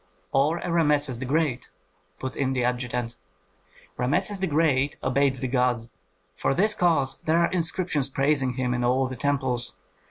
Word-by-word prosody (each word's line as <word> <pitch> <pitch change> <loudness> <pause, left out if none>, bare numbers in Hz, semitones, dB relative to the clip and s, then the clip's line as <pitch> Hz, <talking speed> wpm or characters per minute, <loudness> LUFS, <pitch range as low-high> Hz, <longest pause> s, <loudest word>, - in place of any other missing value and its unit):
"Or 145 +5 +2
a 170 - -4
Rameses 150 -6 +2
the 130 - -4
Great," 140 -3 0 0.5
put 130 -1 -5
in 135 -1 0
the 125 -2 0
adjutant. 125 -1 -2 0.8
"Rameses 185 +11 0
the 190 - 0
Great 145 -3 +1
obeyed 135 +1 +2
the 130 0 -3
gods; 125 -2 0 0.4
for 135 - 0
this 210 +6 +2
cause 160 -8 +1
there 160 +1 +3
are 170 0 +2
inscriptions 170 -5 0
praising 135 -1 +1
him 125 -1 -1
in 125 0 -1
all 130 +2 +2
the 130 0 -5
temples. 130 -5 -1
135 Hz, 160 wpm, -25 LUFS, 125-160 Hz, 0.8 s, there